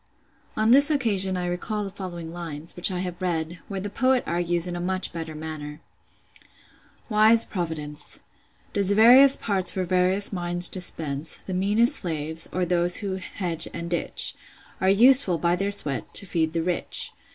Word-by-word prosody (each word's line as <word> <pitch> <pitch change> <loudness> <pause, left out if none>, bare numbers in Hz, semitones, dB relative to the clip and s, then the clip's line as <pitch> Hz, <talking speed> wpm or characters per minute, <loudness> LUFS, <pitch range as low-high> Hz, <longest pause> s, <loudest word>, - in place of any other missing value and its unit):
On 220 +1 +2
this 285 +4 +6
occasion 200 -10 0
I 180 - -3
recall 195 +4 -3
the 195 - -6
following 175 -4 -8
lines, 165 -2 -7
which 175 - +6
I 180 -1 -3
have 180 -1 -6
read; 170 -1 -3
where 195 -1 -5
the 200 - -5
poet 255 +3 +1
argues 175 0 0
in 175 -1 -4
a - - -5
much 185 +1 -2
better 165 -2 -6
manner:— 150 -1 -8 1.3
"——————Wise 220 +1 +4
Providence 155 -5 -3 0.5
Does 200 -2 +1
various 250 +6 +6
parts 190 -4 0
for 190 - -2
various 185 +3 0
minds 175 -1 +4
dispense: 160 -5 -1
The 190 - -8
meanest 205 +6 +1
slaves, 160 -1 -3
or 185 0 -1
those 175 0 +2
who 195 -3 -4
hedge 180 -3 -2
and 170 +1 -6
ditch, 170 - 0 0.5
Are 190 - +2
useful, 230 -2 +5
by 170 +2 +1
their 195 +2 -2
sweat, 150 -9 -1
to - - +4
feed 165 -3 -1
the 165 -1 -1
rich. 180 0 -1
180 Hz, 165 wpm, -24 LUFS, 170-200 Hz, 1.3 s, this